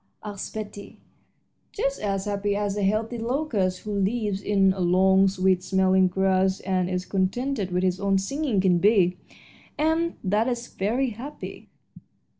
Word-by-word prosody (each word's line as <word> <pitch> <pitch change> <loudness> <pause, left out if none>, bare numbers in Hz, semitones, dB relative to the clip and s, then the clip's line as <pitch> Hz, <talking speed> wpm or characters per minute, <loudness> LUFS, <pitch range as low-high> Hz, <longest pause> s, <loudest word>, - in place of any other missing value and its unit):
asked 205 -1 -7
Betty. 205 -2 -8 0.7
"Just 275 -9 -2
as 195 -2 -1
happy 205 0 -1
as 205 -1 -1
a 205 - -2
healthy 220 +4 0
locust, 225 -7 -1
who 215 - -6
lives 200 0 -1
in 195 -2 +3
long, 190 +1 +3
sweet 190 -1 +1
smelling 190 0 +3
grass 190 +1 +1
and 185 -2 0
is 180 0 -2
contented 200 +3 -1
with 180 0 -1
his 185 0 +1
own 200 -1 +2
singing, 255 +3 -1
can 185 -2 +3
be, 185 -3 +3 0.6
and 320 +2 +1
that 210 +5 +1
is 240 -1 -2
very 235 +6 -1
happy." 265 +8 -9
195 Hz, 145 wpm, -25 LUFS, 190-225 Hz, 0.7 s, in